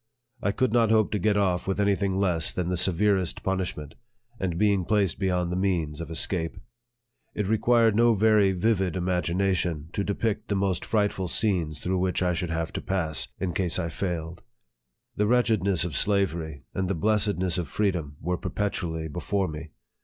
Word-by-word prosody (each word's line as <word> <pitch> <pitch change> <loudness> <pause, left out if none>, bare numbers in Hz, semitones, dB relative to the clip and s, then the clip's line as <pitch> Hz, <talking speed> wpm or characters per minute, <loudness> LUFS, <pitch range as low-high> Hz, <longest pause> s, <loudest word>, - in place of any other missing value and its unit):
I 100 - +1
could 120 +3 0
not 115 -2 +3
hope 110 -1 +3
to 105 - 0
get 105 +2 +2
off 90 -3 0
with 95 +1 -1
any 100 0 +3
thing 95 -1 -1
less 90 -5 +1
than 90 -1 -2
the 90 - 0
severest 95 0 +1
punishment, 90 -6 -3 0.5
and 90 -3 -2
being 100 -1 +2
placed 100 -1 +1
beyond 90 -3 0
the - - -1
means 85 -5 -1
of 85 - -7
escape. 80 +1 0 0.8
It 105 - -1
required 110 +1 +3
no 115 0 +4
very 105 -1 +4
vivid 95 -1 0
imagination 90 -2 -1
to 100 - -1
depict 105 +1 -2
the 100 - -1
most 95 -2 -1
frightful 105 -3 0
scenes 85 -5 0
through 95 +1 0
which 90 0 0
I 90 -1 +1
should 85 +1 -2
have 80 0 -3
to - - -3
pass, 80 -8 -1
in 90 -2 -2
case 90 -1 +2
I 85 -2 -2
failed. 85 -1 -4 0.8
The 105 - +2
wretchedness 110 -7 +2
of 85 -5 -4
slavery, 85 -7 +1
and 95 -1 -1
the 100 - -1
blessed 105 +3 +2
ness 90 -1 +1
of 85 - -3
freedom, 90 -9 -2
were 90 +2 -1
perpetually 85 -6 -3
before 95 +5 -2
me. 80 0 -7
95 Hz, 180 wpm, -26 LUFS, 85-100 Hz, 0.8 s, no